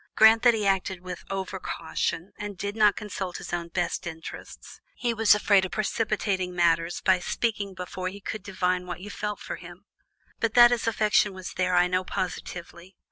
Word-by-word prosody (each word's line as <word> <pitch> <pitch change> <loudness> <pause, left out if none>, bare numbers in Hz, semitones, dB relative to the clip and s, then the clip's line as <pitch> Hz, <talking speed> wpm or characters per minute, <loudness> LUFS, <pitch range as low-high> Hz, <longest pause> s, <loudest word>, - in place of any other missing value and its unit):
Grant 220 +1 +7
that 240 -2 +5
he 215 -2 -1
acted 190 -1 0
with 180 -1 -7
over 190 0 -3
caution, 165 +2 -3
and 205 -2 -5
did 205 +3 -4
not 210 -2 +5
consult 195 -3 -5
his - - -8
own 170 -1 -2
best 175 +1 -2
interests: 160 -1 -9
he 240 -2 -1
was 225 -2 +5
afraid 200 -2 +4
of 190 - -2
precipitating 205 -4 -1
matters 170 0 +2
by 190 -1 +4
speaking 200 0 -2
before 185 0 -5
he 195 +2 -6
could 215 +1 -5
divine 185 -2 -1
what 175 0 -6
you 205 +2 -8
felt 210 0 -4
for - - -6
him. - - -12 0.5
But 230 -1 0
that 240 0 +9
his 235 -1 0
affection 210 -2 +2
was 185 -1 -7
there, 185 0 +1
I 175 0 +5
know 185 +1 0
positively. 180 0 -5
190 Hz, 190 wpm, -27 LUFS, 180-210 Hz, 0.5 s, that